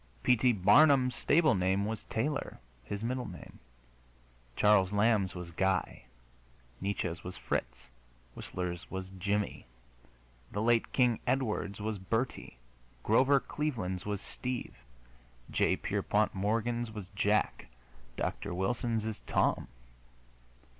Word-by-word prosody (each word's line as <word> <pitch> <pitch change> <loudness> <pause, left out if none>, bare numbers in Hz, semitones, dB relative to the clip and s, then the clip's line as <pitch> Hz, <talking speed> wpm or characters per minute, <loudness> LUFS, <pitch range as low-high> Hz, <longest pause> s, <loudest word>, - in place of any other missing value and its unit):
P. 125 - +5
T. 125 +2 +3
Barnum's 125 - +5
stable 155 +1 +3
name 95 +1 +1
was 110 0 -4
Taylor, 140 +6 -2 0.2
his 100 - -5
middle 125 +2 -2
name; 90 -4 -11 1.0
Charles 105 -3 +4
Lamb's 105 -3 +2
was 90 -1 -7
Guy; 95 -6 -1 0.8
Nietzsche's 90 -4 -2
was 90 +1 -7
Fritz; 60 0 -4 0.4
Whistler's 90 -2 -5
was 95 0 -5
Jimmie; 100 -2 -1 0.8
the 105 - -3
late 115 0 +2
King 125 -3 +3
Edward's 110 -6 -1
was 105 -1 -3
Bertie; 115 - -3 0.5
Grover 130 +5 +4
Cleveland's 115 -13 -3
was 105 -1 -3
Steve; 125 +3 -5 0.8
J. - - +2
Pierpont 105 +1 0
Morgan's 115 +4 -1
was 105 -4 -8
Jack; 105 +1 0 0.5
Dr. 85 - -3
Wilson's 115 +3 -1
is 110 -2 -4
Tom. - - +1
105 Hz, 115 wpm, -31 LUFS, 95-120 Hz, 1.0 s, P